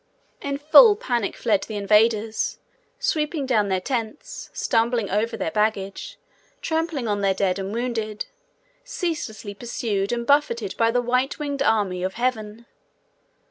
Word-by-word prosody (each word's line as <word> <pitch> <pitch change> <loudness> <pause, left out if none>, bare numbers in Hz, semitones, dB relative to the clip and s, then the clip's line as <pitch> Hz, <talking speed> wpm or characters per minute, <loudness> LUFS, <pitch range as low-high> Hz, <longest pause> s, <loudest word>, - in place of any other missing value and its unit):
In 280 0 -2
full 410 - +7
panic 240 - -2
fled 210 -5 +1
the 220 - -6
invaders, 215 +2 +2 0.4
sweeping 305 - -1
down 220 -6 +2
their 190 -1 +1
tents, 230 +5 -5
stumbling 230 -2 0
over 220 +4 0
their 160 - -2
baggage, 210 - -2 0.4
trampling 320 -6 -2
on 205 -1 -1
their 195 -1 +2
dead 190 -1 0
and 195 +1 -4
wounded, 225 -2 -3 0.6
ceaselessly 330 - -4
pursued 205 -2 -2
and 235 0 -2
buffeted 235 -7 +1
by 230 0 +3
the 245 +1 +1
white 250 +3 0
winged 285 -2 -3
army 205 -9 +1
of 185 +1 -3
heaven. 235 -2 -2
230 Hz, 140 wpm, -23 LUFS, 205-270 Hz, 0.6 s, full